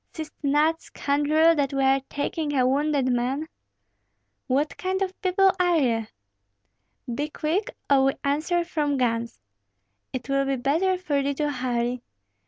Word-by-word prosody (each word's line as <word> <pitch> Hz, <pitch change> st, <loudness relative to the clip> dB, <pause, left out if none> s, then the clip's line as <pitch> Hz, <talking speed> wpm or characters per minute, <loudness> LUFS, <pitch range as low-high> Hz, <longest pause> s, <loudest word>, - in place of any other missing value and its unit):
Seest 315 Hz, -2 st, -6 dB
not, 300 Hz, +3 st, +2 dB
scoundrel, 300 Hz, +3 st, +2 dB
that 285 Hz, -3 st, -1 dB
we 270 Hz, -, +1 dB
are 270 Hz, 0 st, +3 dB
taking 290 Hz, 0 st, -2 dB
a 255 Hz, -, +4 dB
wounded 280 Hz, 0 st, +1 dB
man?" 260 Hz, +6 st, -1 dB, 1.0 s
"What 280 Hz, +4 st, 0 dB
kind 375 Hz, +1 st, -2 dB
of 375 Hz, -1 st, -6 dB
people 380 Hz, +1 st, +4 dB
are 355 Hz, -2 st, +3 dB
ye?" 230 Hz, -6 st, +1 dB, 1.1 s
"Be 290 Hz, +5 st, -2 dB
quick, 335 Hz, +10 st, -1 dB, 0.2 s
or 270 Hz, -1 st, +4 dB
we 270 Hz, -, +3 dB
answer 310 Hz, +5 st, +1 dB
from 295 Hz, -4 st, -1 dB
guns. 230 Hz, -, -1 dB, 0.7 s
It 255 Hz, -, -5 dB
will 275 Hz, 0 st, +1 dB
be 275 Hz, 0 st, 0 dB
better 320 Hz, +9 st, +1 dB
for 305 Hz, -6 st, -1 dB
thee 280 Hz, 0 st, -1 dB
to 295 Hz, 0 st, -1 dB
hurry. 245 Hz, -2 st, -2 dB
285 Hz, 150 wpm, -25 LUFS, 265-320 Hz, 1.1 s, a